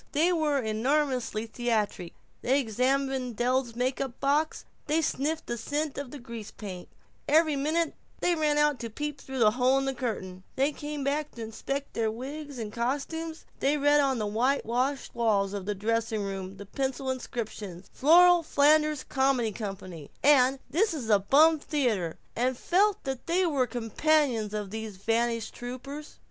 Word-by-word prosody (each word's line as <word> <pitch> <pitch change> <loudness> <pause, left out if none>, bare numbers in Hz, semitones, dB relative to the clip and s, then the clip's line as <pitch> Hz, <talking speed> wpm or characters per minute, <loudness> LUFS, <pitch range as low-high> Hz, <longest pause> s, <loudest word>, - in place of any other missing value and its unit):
They 330 +5 +3
were 305 -4 +1
enormously 250 0 0
theatric. 220 -6 -2 0.3
They 265 +3 +3
examined 255 +1 0
Del's 245 0 0
makeup 255 0 -2
box, 295 +3 +1 0.2
they 305 +2 +2
sniffed 310 0 -1
the 235 0 -4
scent 295 +4 -2
of 280 -1 -7
grease 230 -3 -7
paint, 185 -5 -8 0.4
every 310 0 +4
minute 310 +4 0 0.3
they 355 - +2
ran 305 -3 +1
out 295 -2 +3
to 230 - -5
peep 295 +5 -5
through 265 0 -7
the 220 -4 +5
hole 255 +3 +3
in 270 - 0
the 270 - 0
curtain, 200 -7 -4
they 275 +3 +2
came 295 0 -5
back 295 +2 -1
to 230 - -6
inspect 275 +5 -4
their 225 -1 0
wigs 280 +5 -6
and 215 -3 -5
costumes, 290 +7 -3
they 285 +2 +2
read 290 +1 +4
on 270 -2 +1
the 215 - -1
whitewashed 250 +4 0
walls 205 -4 +1
of 200 -1 -5
the 210 - -1
dressing 225 +1 -1
rooms 195 -1 -5
the 200 - -9
pencil 265 +4 -2
inscriptions: 215 -7 -6
"The - - -23
Flora 350 +4 +7
Flanders 305 -1 +3
Comedy 265 -4 +1
Company," 190 -7 -7
and 270 -2 +5
"This 350 +4 +1
is 235 -7 -3
a 205 - +6
bum 305 +10 +5
theater," 230 - -1 0.2
and 250 +1 0
felt 400 +7 +2
that 265 -2 -5
they 360 +2 +2
were 280 -7 +1
companions 240 -1 +1
of 205 -2 -4
these 220 -2 -6
vanished 230 +2 0
troupers. 275 +5 -8
260 Hz, 165 wpm, -28 LUFS, 225-295 Hz, 0.4 s, Flora